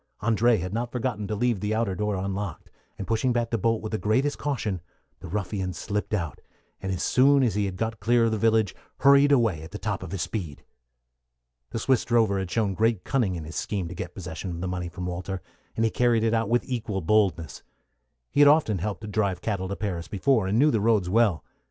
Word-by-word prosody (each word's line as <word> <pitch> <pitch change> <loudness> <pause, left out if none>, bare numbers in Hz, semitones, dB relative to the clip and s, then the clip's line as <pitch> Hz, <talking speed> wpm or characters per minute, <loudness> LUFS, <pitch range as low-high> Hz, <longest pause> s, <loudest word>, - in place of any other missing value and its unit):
André 115 0 +3
had 90 +2 -4
not 120 +1 -2
forgotten 120 -5 -2
to 105 - -2
leave 120 -1 +1
the 105 +2 -1
outer 110 -4 0
door 105 +2 -1
unlocked, 95 0 -4 0.3
and 100 - -5
pushing 115 +5 +1
back 120 -1 -1
the 115 - +1
bolt 115 +2 +1
with 110 - -4
the 110 - -1
greatest 130 +7 +1
caution, 110 - -2 0.4
the 90 - -9
ruffian 95 0 -3
slipped 105 +3 -2
out, 85 -6 -4 0.4
and 95 - -3
as 90 -2 -2
soon 135 +1 +4
as 115 -6 +2
he 105 0 0
had 95 -2 -4
got 110 +2 -2
clear 120 +2 +3
of 115 - +1
the 110 - 0
village 110 -2 +2 0.3
hurried 140 +1 +6
away 115 - +3
at 80 - -9
the 105 - -6
top 105 -2 -3
of 95 - -7
his 95 -5 -2
speed. 85 -10 -5 1.1
The - - -4
Swiss 130 +2 +2
drover 110 -5 +2
had 95 -2 -3
shown 105 -1 0
great 110 -2 +1
cunning 115 -9 0
in 85 - -5
his 80 +2 -9
scheme 95 -5 -2
to - - -6
get 85 -1 -7
possession 90 0 -6
of 85 -1 -5
the 95 - -3
money 90 -1 -3
from 90 +1 -6
Walter, 90 +2 -4 0.4
and 115 - +1
he 110 - +1
carried 120 -2 +2
it 115 0 +2
out 115 -2 +1
with 120 +1 +2
equal 110 -6 -3
boldness. 95 -3 +1 0.7
He 145 - +3
had 145 - +8
often 145 - +3
helped 105 +4 -3
to 105 - -7
drive 100 -3 0
cattle 95 -3 -2
to 100 - -3
Paris 90 -6 -4
before, 110 0 +1
and 100 +3 +1
knew 150 +4 +5
the 110 - +1
roads 105 -5 +2
well. 105 -4 +2
105 Hz, 230 wpm, -26 LUFS, 95-115 Hz, 1.1 s, had